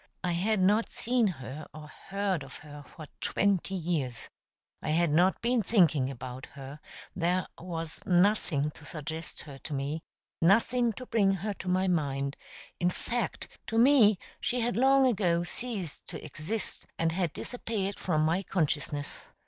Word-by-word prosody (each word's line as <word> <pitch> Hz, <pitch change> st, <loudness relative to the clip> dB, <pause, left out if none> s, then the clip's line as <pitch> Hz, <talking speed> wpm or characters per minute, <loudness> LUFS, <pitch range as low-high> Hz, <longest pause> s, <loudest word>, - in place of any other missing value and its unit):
I 180 Hz, -, +1 dB
had 195 Hz, +5 st, +1 dB
not 205 Hz, +5 st, +3 dB
seen 245 Hz, -2 st, +1 dB
her 140 Hz, -3 st, -6 dB
or 155 Hz, -1 st, -9 dB, 0.2 s
heard 195 Hz, -4 st, 0 dB
of 135 Hz, 0 st, -9 dB
her 145 Hz, -1 st, -9 dB
for 160 Hz, -, -10 dB
twenty 195 Hz, -1 st, +1 dB
years; 155 Hz, -9 st, -2 dB, 0.5 s
I -, -, -3 dB
had 165 Hz, 0 st, +3 dB
not 180 Hz, +5 st, +4 dB
been 240 Hz, 0 st, +3 dB
thinking 165 Hz, -, +3 dB
about 130 Hz, 0 st, -7 dB
her; 140 Hz, +1 st, -10 dB, 0.4 s
there 180 Hz, +1 st, +1 dB
was 165 Hz, -2 st, -5 dB
nothing 175 Hz, -5 st, +2 dB
to 150 Hz, -, -15 dB
suggest 160 Hz, +2 st, -6 dB
her 140 Hz, -4 st, -10 dB
to 150 Hz, -, -6 dB
me, 140 Hz, +4 st, -2 dB, 0.4 s
nothing 230 Hz, +7 st, +4 dB
to 255 Hz, -, -8 dB
bring 205 Hz, -5 st, +3 dB
her 210 Hz, -, 0 dB
to 190 Hz, -, -9 dB
my 185 Hz, +1 st, +2 dB
mind; 140 Hz, -5 st, 0 dB, 0.4 s
in 175 Hz, -1 st, +3 dB
fact, 235 Hz, +6 st, -3 dB, 0.2 s
to 225 Hz, -, -1 dB
me 230 Hz, -5 st, +6 dB, 0.2 s
she 250 Hz, -, 0 dB
had 240 Hz, +1 st, 0 dB
long 270 Hz, +2 st, +5 dB
ago 180 Hz, -8 st, +2 dB
ceased 190 Hz, -, -4 dB
to -, -, -7 dB
exist, 155 Hz, +9 st, -4 dB
and 165 Hz, 0 st, +1 dB
had 175 Hz, -2 st, 0 dB
disappeared 210 Hz, -4 st, -3 dB
from 155 Hz, -4 st, +1 dB
my 165 Hz, +4 st, +2 dB
consciousness. 150 Hz, -5 st, -2 dB
175 Hz, 155 wpm, -30 LUFS, 155-210 Hz, 0.5 s, me